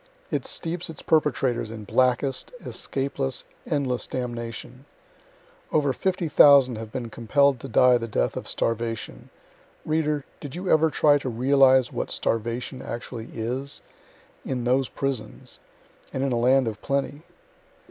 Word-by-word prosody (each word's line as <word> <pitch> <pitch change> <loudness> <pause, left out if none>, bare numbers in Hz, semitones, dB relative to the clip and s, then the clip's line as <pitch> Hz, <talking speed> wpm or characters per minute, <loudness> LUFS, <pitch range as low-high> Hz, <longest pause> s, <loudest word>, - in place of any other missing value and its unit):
It - - -1
steeps 170 +1 -3
its 160 - -9
perpetrators 135 -7 +1
in 110 -1 -7
blackest, 130 +5 +1
escapeless, 135 -1 -2 0.2
endless 135 -5 -1
damnation. 120 +1 -6 0.8
Over 145 -3 +2
50,000 145 -7 +5
have 110 -1 -7
been 120 -2 -5
compell' 140 +6 +3
d 125 - -15
to 135 - -7
die 125 0 +5
the 115 - -4
death 80 - 0
of - - -5
starvation 115 - -3 0.6
reader, 150 -2 0
did 145 +1 -8
you 180 +1 -2
ever 160 +1 +5
try 145 -1 +4
to 135 - -4
realize 130 +1 +4
what - - -3
starvation 120 +3 -2
actually 120 -1 -6
is? 125 +5 -3 0.6
in 125 -2 -3
those 130 +2 +2
prisons 135 -5 -4 0.5
and 130 - -2
in 135 - 0
a - - +1
land 130 +1 +4
of 105 -2 -4
plenty.) 140 +1 -2
130 Hz, 135 wpm, -25 LUFS, 120-140 Hz, 0.8 s, 50,000